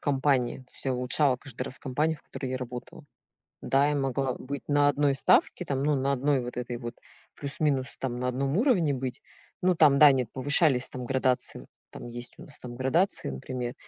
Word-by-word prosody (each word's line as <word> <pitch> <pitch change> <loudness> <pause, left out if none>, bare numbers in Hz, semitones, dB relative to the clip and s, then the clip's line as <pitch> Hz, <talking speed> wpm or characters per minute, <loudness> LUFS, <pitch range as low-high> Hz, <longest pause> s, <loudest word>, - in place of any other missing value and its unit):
компании, 135 -3 +1
то 130 - -18
есть - - -11
я 135 -1 0
улучшала 125 +2 +2
каждый 130 -2 -8
раз 125 - -4
компанию, 150 +5 -1
в - - -22
которой 130 - -6
я 130 - -1
работала. 125 -1 -8 0.6
Да, 140 +2 +3
я 150 - +1
могла 135 -1 0
быть 140 +1 -6
на 145 0 +4
1 145 -1 +2
ставке 135 - +2
там, 135 -1 -1
ну, 150 0 +2
на 135 +1 0
1 140 0 +1
вот 120 0 -7
этой 120 -1 -4
вот 120 -1 -7 0.4
плюс-минус 140 -2 -1
там 125 -2 -3
на 125 - -1
одном 135 +4 -1
уровне 195 - +3
быть. 130 -1 -4 0.4
Ну, 185 0 +3
там 145 -4 +5
да, 150 -2 +9
нет, 130 -3 0
повышались 135 -1 +2
там 125 -1 -6
градации. 130 - 0 0.3
Там - - -9
есть 120 +1 -7
у - - -11
нас 145 - -13
там 120 -1 -9
градации, 135 - 0
например. 120 - -5
135 Hz, 200 wpm, -28 LUFS, 125-145 Hz, 0.6 s, да